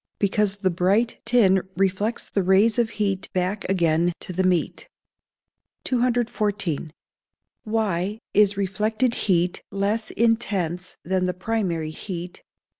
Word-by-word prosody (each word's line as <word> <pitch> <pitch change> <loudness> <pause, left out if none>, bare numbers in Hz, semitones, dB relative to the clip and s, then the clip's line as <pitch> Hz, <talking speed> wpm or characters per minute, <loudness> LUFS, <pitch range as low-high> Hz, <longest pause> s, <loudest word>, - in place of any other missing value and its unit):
_ - - -69 0.2
Because 200 0 +2
the 195 -2 0
bright 195 +7 +1
tin 195 -6 +4 0.2
reflects 195 +4 0
the 200 - 0
rays 195 +5 +3
of 235 -2 +2
heat 200 -2 -1
back 185 +2 -1
again 170 -2 +2
to 185 - -6
the 185 - 0
meat. 180 -3 0 0.9
214. 215 - 0 0.8
_Why 210 -2 -1 0.2
is 205 -1 +4
reflected 215 +5 0 0.2
heat 175 -1 +2
less 205 +3 -1
intense 195 -6 0
than 185 +1 0
the 180 - -2
primary 180 -6 -2
heat? 175 +1 -7
195 Hz, 120 wpm, -24 LUFS, 180-215 Hz, 0.9 s, tin